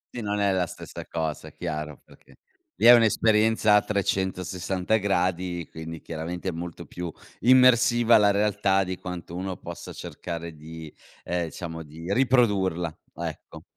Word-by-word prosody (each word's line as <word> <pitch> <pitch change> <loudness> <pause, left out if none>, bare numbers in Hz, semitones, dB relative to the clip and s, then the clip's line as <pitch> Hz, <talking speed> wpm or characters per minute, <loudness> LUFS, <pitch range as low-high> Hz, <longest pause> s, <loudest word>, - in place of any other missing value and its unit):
Sì 120 - -4
non 105 0 -2
è 100 -1 +3
la 90 -2 +1
stessa - - -9
cosa 80 -2 -3
chiaro 75 -4 -5
perché - - -20 0.4
lì 110 - 0
è 120 - +11
un'esperienza 110 -1 +4
a 105 - +6
360 95 0 -1
gradi, 90 -3 -1
quindi 80 0 -7
chiaramente 85 +3 -5
è - - -2
molto 85 0 -7
più 90 -2 -6 0.3
immersiva 120 -2 +6
la 105 -1 +5
realtà 100 -1 +2
di 95 0 -4
quanto 90 -1 -7
uno 95 0 -4
possa - - -8
cercare 85 -1 -6
di, 80 0 -10 0.3
ehm, 90 -1 -1
diciamo 80 0 -7
di 80 +5 -6
riprodurla, 100 - +2 0.2
ecco. 80 -2 -7
90 Hz, 145 wpm, -26 LUFS, 85-105 Hz, 0.4 s, è